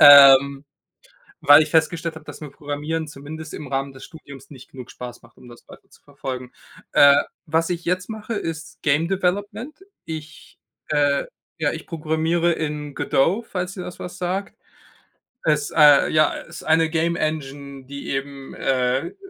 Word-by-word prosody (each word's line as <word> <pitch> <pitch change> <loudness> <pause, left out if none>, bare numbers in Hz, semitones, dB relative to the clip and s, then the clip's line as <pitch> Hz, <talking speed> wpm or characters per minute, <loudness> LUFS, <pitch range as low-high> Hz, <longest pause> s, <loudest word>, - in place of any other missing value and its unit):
ähm, 140 0 +9 0.8
weil 145 +2 +8
ich 150 - -8
festgestellt 165 +1 +1
habe, 160 - -11
dass - - -10
mir 150 - -8
Programmieren 150 +2 -4
zumindest 150 +2 -9
im 150 - -7
Rahmen 135 +1 -2
des 135 0 -12
Studiums 140 -5 -13
nicht 130 -3 -14
genug 125 -2 -10
Spaß 120 -1 -9
macht, 115 -1 -21
um 125 - -15
das 120 - -16
weiter - - -16
zu - - -22
verfolgen. 125 -1 -7 0.4
Äh, 140 0 +7 0.2
was 165 +2 0
ich 175 -1 -3
jetzt 180 +1 -1
mache, 220 +1 -5
ist 165 -3 -6
Game 155 +3 +1
Development. 205 +8 -2 0.3
Ich, 155 -1 -9 0.3
äh 145 -2 +2 0.3
ja, 150 -2 +1
ich 160 - -7
programmiere 165 +1 0
in 150 -2 -4
Godot, 190 +12 +1
falls 180 -3 -4
dir 185 -2 -6
das 180 - -9
was 180 0 -7
sagt. 185 +2 -3 0.9
Es, 150 -2 +1
äh 150 -3 +7
ja, 155 -1 +3
ist - - -9
eine 160 0 +3
Game 170 +1 0
Engine, 140 -3 -4
die 140 +1 -7
eben, 135 0 -5
äh 130 0 0
äh, - - -17
155 Hz, 165 wpm, -22 LUFS, 140-165 Hz, 0.9 s, ähm